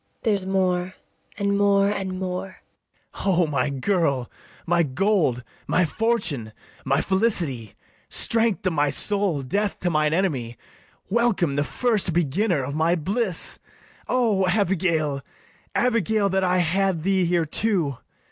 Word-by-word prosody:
There's 200 -5 0
more, 185 -1 0 0.4
and 200 -1 0
more, 200 -1 +4
and 195 -2 -2
more. 185 0 -5 0.5
BARABAS. - - -8
O 180 -3 +3
my 145 -3 0
girl, 140 - 0 0.3
My 175 0 +2
gold, 155 - +1 0.2
my 185 - +2
fortune, 155 - -1 0.3
my 135 +3 +1
felicity, 175 - 0 0.3
Strength 225 -4 +2
to 185 - +1
my 145 -2 +1
soul, 195 -5 0
death 200 +9 -1
to 175 - 0
mine 155 -1 +2
enemy; 140 - -1 0.5
Welcome 210 -10 +1
the 145 - +1
first 215 -1 0
beginner 175 0 +1
of 140 +2 -4
my 160 +3 +2
bliss! 190 +3 -1 0.5
O 220 -7 +2
Abigail, 170 -7 +1 0.5
Abigail, 220 -4 +1
that 190 0 0
I 180 0 +2
had 180 0 +1
thee 190 0 +2
here 170 -1 +1
too! 165 - 0
185 Hz, 130 wpm, -23 LUFS, 155-200 Hz, 0.5 s, more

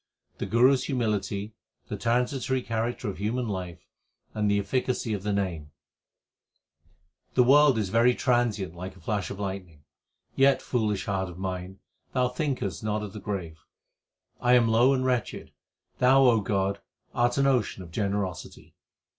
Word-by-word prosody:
1 - - -43
The - - -2
Guru 125 +4 +5
s 130 - -1
humility, 105 -5 -2 0.3
the - - -4
transitory 125 +2 0
character 115 +1 -2
of 95 -3 -5
human 115 +4 -1
life, 90 -4 -5 0.5
and 105 -1 0
the 100 - +3
efficacy 120 +2 -1
of 100 - -3
the 105 +1 -2
Name: 90 -7 -2 1.7
The 125 - +6
world 140 0 +6
is 105 -4 -1
very 120 +4 +4
transient 115 -8 0
like 95 +2 -7
a - - -16
flash 100 +1 -2
of 100 - -7
lightning; 95 -6 -6 0.5
Yet, 135 0 +4
foolish 105 -5 -1
heart 95 -2 -2
of 90 - -10
mine, 95 0 -5 0.3
thou 125 -1 +2
thinkest 125 -7 -3
not 105 0 -1
of 105 - -7
the 105 - -7
grave. 90 -6 -5 0.8
I 125 0 +3
am 120 -2 +4
low 120 +4 +5
and 130 -1 +1
wretched; 125 -3 -2 0.5
Thou, 135 +2 +5
O 120 -4 +5
God, 100 0 -1 0.3
art 120 +1 +1
an 140 - +3
ocean 125 -8 +1
of 85 - -13
generosity. 100 -3 -4
105 Hz, 160 wpm, -27 LUFS, 95-125 Hz, 1.7 s, The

